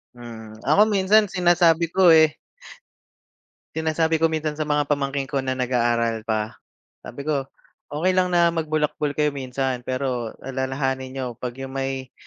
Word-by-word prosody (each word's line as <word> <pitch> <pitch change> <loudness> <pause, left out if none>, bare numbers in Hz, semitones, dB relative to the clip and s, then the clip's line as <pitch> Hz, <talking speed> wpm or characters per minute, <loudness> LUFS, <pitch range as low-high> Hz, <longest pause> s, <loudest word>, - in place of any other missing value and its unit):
Mhm, 110 -2 -10
ako 155 +9 +4
minsan 205 +1 +3
sinasabi 175 -2 +3
ko, 190 -2 +5
eh. 160 -2 +6 1.4
Sinasabi 160 0 +1
ko 165 - +2
minsan 155 -1 -2
sa 155 - -1
mga 145 -1 0
pamangkin 140 -1 -1
ko 135 -3 -2
na 130 - 0
nag-aaral 120 -3 0
pa. 110 -1 -2 0.4
Sabi 140 - -9
ko, 140 -3 -1 0.4
"okey 165 +6 0
lang 185 0 +2
na 170 -1 +3
magbulakbol 150 -2 -1
kayo 150 -1 +1
minsan 130 -1 -3
pero 130 -2 -3
alalahanin 130 0 -2
niyo 130 0 -5
pag 120 +2 -7
yung 135 0 -7
may, 135 -1 -4
140 Hz, 145 wpm, -23 LUFS, 130-160 Hz, 1.4 s, eh